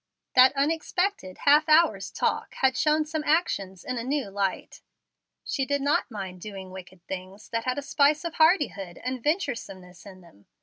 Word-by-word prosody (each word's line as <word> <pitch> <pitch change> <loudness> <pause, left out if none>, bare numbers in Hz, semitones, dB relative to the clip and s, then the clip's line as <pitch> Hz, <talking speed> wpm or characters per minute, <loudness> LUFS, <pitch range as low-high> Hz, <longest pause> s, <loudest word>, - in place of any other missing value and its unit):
That 255 +1 +7
unexpected 315 - -1
half 300 +2 +5
hour's 320 +2 +4
talk - - -2
had 260 -2 +2
shown 305 +1 +2
some 310 0 -3
actions 200 - 0
in 255 -1 -3
a - - -4
new 275 -3 -2
light. 195 -1 -3 0.6
She 270 - -2
did 285 +1 0
not 285 +1 +1
mind 190 -5 -7
doing 195 -2 -8
wicked 185 -1 -12
things 190 +2 -8
that 230 0 -3
had 255 +1 -1
a 285 - -3
spice 295 +3 +2
of 335 - -3
hardihood 290 - +2
and 255 0 -3
venturesomeness 205 - -3
in 185 -1 -13
them. 100 - -21
255 Hz, 170 wpm, -26 LUFS, 190-300 Hz, 0.6 s, That